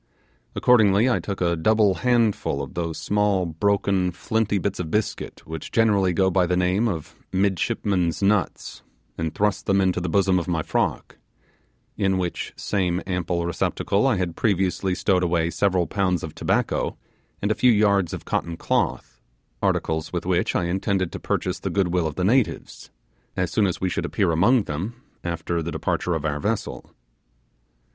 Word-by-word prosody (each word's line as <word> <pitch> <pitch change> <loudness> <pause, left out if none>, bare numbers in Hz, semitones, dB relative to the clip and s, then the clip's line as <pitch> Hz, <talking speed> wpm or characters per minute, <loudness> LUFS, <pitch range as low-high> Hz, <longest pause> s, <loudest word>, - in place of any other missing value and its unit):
Accordingly 110 -2 +4
I 125 - +2
took 100 -2 -5
a 85 -1 +2
double 105 +4 +3
handful 115 - +1
of 65 - -8
those 85 -2 -3
small, 105 -3 +1
broken, 95 +2 +1
flinty 105 +4 -1
bits 100 0 -2
of 85 -3 -3
biscuit 105 +4 -3
which 80 -1 -7
generally 105 -5 +3
go 95 +2 +2
by 90 -1 +2
the 90 +1 +1
name 90 +5 +2
of 80 -8 -4 0.2
'midshipmen's 95 -1 0
nuts', 100 -1 0 0.3
and 80 +1 -3
thrust 105 -1 0
them 100 0 +3
into 95 -2 +1
the 90 - -2
bosom 95 0 +3
of 85 - -5
my 80 -3 -1
frock - - -2 0.8
in 95 -2 +1
which 90 -2 -3
same 90 -3 -1
simple 90 -2 -1
receptacle 100 +5 0
I 130 - +3
had 90 -3 -2
previously 95 -2 0
stowed 95 -2 +1
away 85 -1 +1
several 95 -3 +1
pounds 90 -4 0
of 80 - -6
tobacco - - -1 0.4
and 100 - 0
a - - +4
few 125 +3 +4
yards 100 -5 +3
of - - -6
cotton 85 0 -2
cloth - - -1 0.4
articles 80 0 0
with 90 -1 -3
which 90 -1 0
I - - +1
intended 95 +1 -1
to - - -6
purchase - - -2
the - - -3
good 95 -3 +1
will 85 -2 +1
of 75 - -5
the 90 - -2
natives, 120 +5 0 0.5
as 90 -1 0
soon 105 -2 +2
as 90 - -3
we 95 - 0
should 90 - -2
appear - - +1
among 105 +9 +4
them 95 +9 -4 0.3
after 85 0 -2
the 85 +1 -4
departure 85 +2 -1
of 80 -1 -3
our 75 -1 -1
vessel. 105 +6 -3
95 Hz, 170 wpm, -24 LUFS, 85-100 Hz, 0.8 s, Accordingly